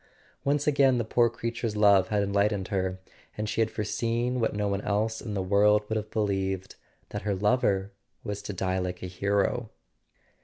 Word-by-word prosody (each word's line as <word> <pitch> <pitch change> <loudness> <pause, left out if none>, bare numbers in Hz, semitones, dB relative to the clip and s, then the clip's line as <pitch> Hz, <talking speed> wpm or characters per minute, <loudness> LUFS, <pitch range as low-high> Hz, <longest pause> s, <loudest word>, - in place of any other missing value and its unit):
Once 145 +1 +1
again 140 -3 +4
the 115 - -1
poor 120 +1 +3
creature's 115 -1 -3
love 100 -2 +5
had 105 -1 +1
enlightened 100 -1 0
her, 95 -1 -1 0.4
and 105 0 -2
she 115 - 0
had 110 - +2
foreseen 115 +4 -1
what 115 - 0
no 105 0 0
one 100 0 -1
else 110 +2 -1
in 105 -3 -5
the 95 - -1
world 105 +2 +3
would 110 - -1
have 110 0 -3
believed: 95 -3 -1 0.3
that - - -4
her 100 0 -1
lover 100 -2 +1 0.3
was 100 0 -4
to 105 - -5
die 95 -1 -1
like 90 -1 -4
a - - -2
hero. 100 +5 0
105 Hz, 185 wpm, -28 LUFS, 100-115 Hz, 0.4 s, love